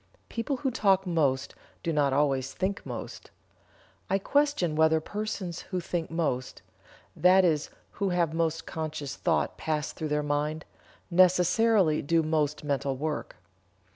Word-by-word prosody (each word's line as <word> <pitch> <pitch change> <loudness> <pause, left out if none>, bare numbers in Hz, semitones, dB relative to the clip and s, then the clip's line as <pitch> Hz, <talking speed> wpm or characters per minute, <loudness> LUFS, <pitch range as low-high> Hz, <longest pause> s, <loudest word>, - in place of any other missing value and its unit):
People 235 +4 -2
who 265 0 -1
talk 195 -5 +2
most 145 -7 0 0.3
do 165 - -1
not 145 -2 +2
always 135 -2 +1
think 195 +1 -2
most. - - -7 0.8
I 195 - +3
question 280 - +1
whether 160 0 +4
persons 190 -1 -4
who 185 - -1
think 170 -1 -3
most 150 -7 -2 0.5
that 185 +1 +5
is 155 -3 +1 0.2
who 200 - -1
have 170 -3 +1
most 165 -1 -1
conscious 150 -3 -5
thought 170 -2 0
pass 155 -1 -2
through 160 - -4
their 150 0 0
mind 150 +2 -1 0.5
necessarily 180 0 +4
do 165 +3 +2
most 155 -1 0
mental 140 -2 -1
work. 150 +1 -3
160 Hz, 140 wpm, -28 LUFS, 150-185 Hz, 0.8 s, that